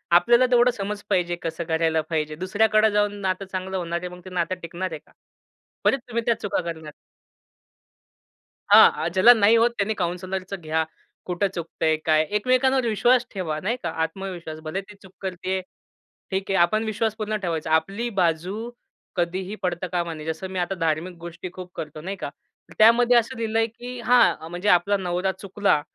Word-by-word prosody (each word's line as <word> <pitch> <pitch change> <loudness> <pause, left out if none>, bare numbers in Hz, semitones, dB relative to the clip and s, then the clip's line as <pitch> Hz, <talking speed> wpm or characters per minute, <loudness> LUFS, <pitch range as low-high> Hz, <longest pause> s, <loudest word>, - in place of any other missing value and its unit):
आपल्याला 240 +7 +5
तेवढं 245 0 +5
समज 205 +1 -4
पाहिजे 175 -1 +1
कसं 165 +1 -3
करायला 160 -1 +1
पाहिजे. 155 -1 -1
दुसऱ्याकडे 215 +4 +2
जाऊन 205 0 +1
नातं 190 +1 -1
चांगलं 190 0 -3
होणार 170 -1 -2
आहे 180 - -4
मग - - -13
ते 185 - -8
नातं 180 0 -1
टिकणार 175 +2 -4
आहे 160 - -5
का? - - -27 0.7
परत 270 - +3
तुम्ही 235 -1 -2
त्या 235 - +1
चुका 205 - -1
करणार. 160 -3 -6 1.8
हां, - - +10
अ, - - +1
ज्याला 190 +6 +8
नाही 220 +1 +5
होत 235 +1 +4
त्यांनी 205 +2 0
काउन्सिलरचं 185 +1 -3
घ्या. 160 +1 0 0.4
कुठे 180 +2 0
चुकतंय, 160 -2 -1
काय? 155 -1 +4
एकमेकांवर 255 +3 +2
विश्वास 240 +3 +3
ठेवा, 170 -6 -3
नाही 230 +6 -1
का? - - -2
आत्मविश्वास. 170 -2 -5
भले 160 +5 -3
ती 200 +1 -14
चूक 190 -1 -15
करतीये, 190 0 -3 0.7
ठीक 190 0 -2
आहे. 195 - +2
आपण 215 +6 +3
विश्वास 220 0 -1
पूर्ण 215 -1 -2
ठेवायचा. 165 -3 -2
आपली 195 +9 0
बाजू 180 +8 -1 0.5
कधीही 185 +3 -2
पडता 180 0 -1
कामा 170 -2 -1
नये. 155 0 -9
जसं 160 +4 -4
मी 190 - -4
आता 180 +2 -1
धार्मिक 165 +2 -1
गोष्टी 170 +1 -7
खूप 180 -1 -9
करतो, 155 0 -6
नाही 195 +4 -5
का? - - -5 0.4
तर - - -15
त्यामध्ये 235 +2 +6
असं 235 +3 +1
लिहिलंय, 225 0 +1
की 245 +2 -9
हां 240 -9 +4
म्हणजे 180 +4 -3
आपला 190 +3 +4
नवरा 185 0 -1
चुकला, 195 -3 0
185 Hz, 175 wpm, -24 LUFS, 170-215 Hz, 1.8 s, हां